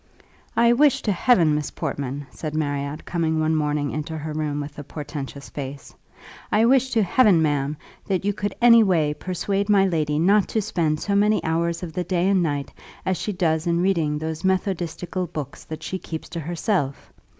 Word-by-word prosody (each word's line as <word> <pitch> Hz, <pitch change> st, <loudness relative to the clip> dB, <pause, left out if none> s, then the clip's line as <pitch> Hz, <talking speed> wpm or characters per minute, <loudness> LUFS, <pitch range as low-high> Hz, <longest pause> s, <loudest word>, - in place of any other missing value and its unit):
"I 235 Hz, 0 st, +5 dB
wish 285 Hz, +2 st, +3 dB
to 210 Hz, -, +1 dB
Heaven, 175 Hz, -5 st, +4 dB
Miss 150 Hz, -1 st, -1 dB
Portman," 140 Hz, +1 st, -4 dB
said 155 Hz, -1 st, -6 dB
Marriott, 145 Hz, 0 st, -2 dB
coming 160 Hz, -2 st, 0 dB
one 155 Hz, 0 st, +1 dB
morning 150 Hz, -1 st, 0 dB
into 155 Hz, +1 st, -4 dB
her 155 Hz, 0 st, -5 dB
room 150 Hz, -1 st, -2 dB
with 145 Hz, 0 st, -6 dB
a -, -, -6 dB
portentous 145 Hz, -1 st, -7 dB
face, 140 Hz, -1 st, -7 dB, 0.6 s
"I 220 Hz, +2 st, +4 dB
wish 260 Hz, +1 st, +4 dB
to 225 Hz, -2 st, +3 dB
Heaven, 200 Hz, -2 st, +4 dB
ma'am, 145 Hz, -1 st, 0 dB, 0.3 s
that 195 Hz, -1 st, -1 dB
you 205 Hz, -, +1 dB
could 205 Hz, -1 st, -3 dB
any 235 Hz, -1 st, +8 dB
way 165 Hz, -8 st, +2 dB
persuade 195 Hz, +4 st, -2 dB
my 200 Hz, -2 st, +5 dB
lady 155 Hz, -5 st, 0 dB
not 195 Hz, +5 st, +4 dB
to 220 Hz, -, 0 dB
spend 160 Hz, -6 st, 0 dB
so 200 Hz, -, -1 dB
many 210 Hz, +1 st, +3 dB
hours 165 Hz, +2 st, -1 dB
of 165 Hz, -3 st, -6 dB
the 180 Hz, -, -1 dB
day 180 Hz, 0 st, 0 dB
and 195 Hz, -2 st, +3 dB
night 145 Hz, -4 st, -2 dB, 0.3 s
as 190 Hz, -, +1 dB
she 210 Hz, -, -3 dB
does 165 Hz, -3 st, 0 dB
in 170 Hz, 0 st, +2 dB
reading 165 Hz, -6 st, +1 dB
those 160 Hz, +2 st, -4 dB
methodistical 185 Hz, -1 st, -1 dB
books 150 Hz, -5 st, -7 dB
that 155 Hz, -, -7 dB
she 190 Hz, -, -4 dB
keeps 160 Hz, -3 st, -7 dB
to 170 Hz, -, -5 dB
herself! 165 Hz, -2 st, -2 dB
165 Hz, 190 wpm, -23 LUFS, 150-195 Hz, 0.6 s, any